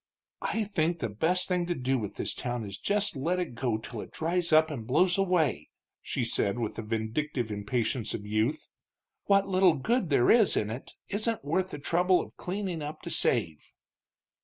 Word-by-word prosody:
"I 225 Hz, -, -1 dB
think 170 Hz, -5 st, 0 dB
the 115 Hz, -8 st, -3 dB
best 165 Hz, -, +3 dB
thing 180 Hz, -2 st, 0 dB
to 175 Hz, -, -1 dB
do 130 Hz, -1 st, 0 dB
with 105 Hz, -2 st, -5 dB
this -, -, -1 dB
town 120 Hz, -2 st, -3 dB
is 100 Hz, 0 st, -7 dB
just 205 Hz, -3 st, +2 dB
let 170 Hz, +7 st, -1 dB
it 175 Hz, -8 st, -3 dB
go 120 Hz, -2 st, -1 dB
till 110 Hz, 0 st, -7 dB
it -, -, -10 dB
dries 170 Hz, +1 st, -1 dB
up 155 Hz, 0 st, +5 dB
and 115 Hz, -6 st, -6 dB
blows 175 Hz, +7 st, +3 dB
away," 175 Hz, -, +1 dB, 0.3 s
she -, -, -2 dB
said, 100 Hz, +3 st, +1 dB
with 115 Hz, -3 st, -2 dB
the -, -, -3 dB
vindictive 115 Hz, +3 st, -2 dB
impatience 110 Hz, +3 st, -1 dB
of 105 Hz, -, -7 dB
youth. 110 Hz, +8 st, -1 dB, 0.6 s
"What 200 Hz, -1 st, +3 dB
little 185 Hz, -3 st, +4 dB
good 210 Hz, -, 0 dB
there 130 Hz, -4 st, +4 dB
is 225 Hz, -4 st, +5 dB
in 105 Hz, 0 st, -1 dB
it 120 Hz, +4 st, -8 dB, 0.2 s
isn't 215 Hz, -4 st, 0 dB
worth 185 Hz, +5 st, 0 dB
the 150 Hz, -, -6 dB
trouble 180 Hz, +5 st, +2 dB
of -, -, -7 dB
cleaning 185 Hz, -3 st, -4 dB
up 150 Hz, +1 st, -7 dB
to -, -, -5 dB
save." 80 Hz, -2 st, +1 dB
150 Hz, 190 wpm, -28 LUFS, 115-180 Hz, 0.6 s, up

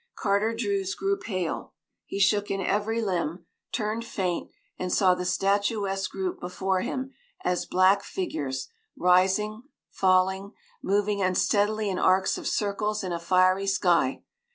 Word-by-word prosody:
Carter 210 Hz, +2 st, +1 dB
Druse 200 Hz, -4 st, -1 dB
grew 395 Hz, 0 st, 0 dB
pale; 185 Hz, -, -4 dB, 0.3 s
he -, -, -5 dB
shook 205 Hz, +1 st, +3 dB
in 195 Hz, -, -1 dB
every 210 Hz, +4 st, 0 dB
limb, 175 Hz, -3 st, -2 dB, 0.3 s
turned 220 Hz, 0 st, -2 dB
faint, 185 Hz, -6 st, -2 dB, 0.3 s
and 185 Hz, 0 st, -2 dB
saw 185 Hz, -1 st, +4 dB
the 180 Hz, 0 st, -3 dB
statuesque 195 Hz, +1 st, 0 dB
group 190 Hz, -2 st, -3 dB
before 185 Hz, +1 st, -1 dB
him 265 Hz, +4 st, -4 dB, 0.3 s
as 180 Hz, 0 st, 0 dB
black 185 Hz, +2 st, +4 dB
figures, 140 Hz, -10 st, -4 dB, 0.3 s
rising, 190 Hz, +4 st, +3 dB, 0.3 s
falling, 190 Hz, +2 st, +2 dB, 0.3 s
moving 205 Hz, +1 st, +1 dB
unsteadily 205 Hz, +3 st, +1 dB
in 190 Hz, -2 st, -1 dB
arcs 190 Hz, +1 st, +3 dB
of -, -, -5 dB
circles 210 Hz, 0 st, -1 dB
in 185 Hz, -, -3 dB
a 170 Hz, -, -2 dB
fiery 185 Hz, +3 st, +3 dB
sky. 175 Hz, -8 st, +2 dB
195 Hz, 135 wpm, -27 LUFS, 185-205 Hz, 0.3 s, saw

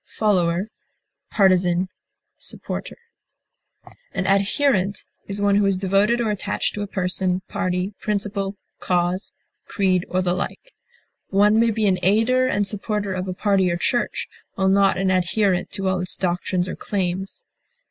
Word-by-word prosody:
aider, 185 Hz, -3 st, +2 dB, 0.6 s
backer, 185 Hz, -2 st, +3 dB, 0.6 s
follower, -, -, -6 dB, 1.2 s
An 185 Hz, -, -1 dB
adherent 200 Hz, +1 st, +2 dB, 0.2 s
is 200 Hz, +1 st, -3 dB
one 205 Hz, 0 st, +3 dB
who 205 Hz, -, +3 dB
is 195 Hz, -1 st, +1 dB
devoted 195 Hz, +5 st, +2 dB
or 225 Hz, -3 st, +1 dB
attached 205 Hz, 0 st, -2 dB
to 205 Hz, -, -4 dB
a 205 Hz, -, -3 dB
person, 185 Hz, -1 st, 0 dB
party, 185 Hz, -1 st, -2 dB
principle, 200 Hz, -1 st, -2 dB, 0.2 s
cause, 180 Hz, +2 st, 0 dB, 0.4 s
creed, 185 Hz, -3 st, +1 dB
or 185 Hz, 0 st, 0 dB
the 175 Hz, -1 st, +1 dB
like. 350 Hz, -, -5 dB, 0.6 s
One 205 Hz, +2 st, +4 dB
may 230 Hz, 0 st, +4 dB
be 220 Hz, -1 st, 0 dB
an 190 Hz, -2 st, +2 dB
aider 225 Hz, +7 st, +3 dB
and 205 Hz, -5 st, +1 dB
supporter 205 Hz, 0 st, -2 dB
of 185 Hz, 0 st, -3 dB
a 185 Hz, -, -2 dB
party 195 Hz, -2 st, +2 dB
or 170 Hz, -, -1 dB
church, 240 Hz, +7 st, -1 dB, 0.3 s
while 190 Hz, 0 st, +2 dB
not 195 Hz, 0 st, +4 dB
an 190 Hz, 0 st, +1 dB
adherent 185 Hz, 0 st, +1 dB
to 195 Hz, -1 st, -2 dB
all 185 Hz, -1 st, +1 dB
its 180 Hz, 0 st, -2 dB
doctrines 180 Hz, 0 st, -1 dB
or -, -, -4 dB
claims. 190 Hz, -1 st, -3 dB
195 Hz, 145 wpm, -22 LUFS, 185-205 Hz, 1.2 s, One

